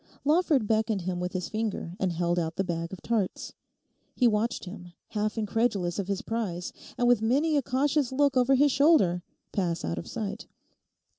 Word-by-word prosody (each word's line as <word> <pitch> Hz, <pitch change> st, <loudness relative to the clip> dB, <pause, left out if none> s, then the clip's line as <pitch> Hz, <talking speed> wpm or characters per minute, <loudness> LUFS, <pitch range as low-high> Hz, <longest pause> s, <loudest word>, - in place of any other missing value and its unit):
Lawford 300 Hz, -5 st, +3 dB
beckoned 220 Hz, -1 st, +1 dB
him 180 Hz, 0 st, -3 dB
with 180 Hz, 0 st, -3 dB
his 185 Hz, -1 st, -2 dB
finger 215 Hz, -6 st, -3 dB
and 185 Hz, -2 st, +1 dB
held 175 Hz, +1 st, 0 dB
out 165 Hz, -1 st, -2 dB
the 195 Hz, -, 0 dB
bag 170 Hz, -2 st, -3 dB
of 190 Hz, -, -9 dB
tarts. 220 Hz, -5 st, -2 dB, 0.6 s
He 250 Hz, -, +4 dB
watched 220 Hz, 0 st, 0 dB
him, 180 Hz, -2 st, -10 dB, 0.2 s
half 215 Hz, +1 st, -2 dB
incredulous 210 Hz, -5 st, 0 dB
of 195 Hz, -, -2 dB
his 200 Hz, -1 st, -2 dB
prize, 195 Hz, -7 st, -3 dB, 0.2 s
and 245 Hz, -, +2 dB
with 245 Hz, -3 st, +4 dB
many 285 Hz, +8 st, +2 dB
a 285 Hz, -, +3 dB
cautious 270 Hz, +2 st, +1 dB
look 280 Hz, +1 st, +2 dB
over 255 Hz, +1 st, +4 dB
his 285 Hz, +2 st, +4 dB
shoulder, 265 Hz, -, +4 dB, 0.3 s
pass 175 Hz, -4 st, -1 dB
out 85 Hz, 0 st, -2 dB
of -, -, -8 dB
sight. 210 Hz, 0 st, -5 dB
215 Hz, 180 wpm, -28 LUFS, 180-250 Hz, 0.6 s, He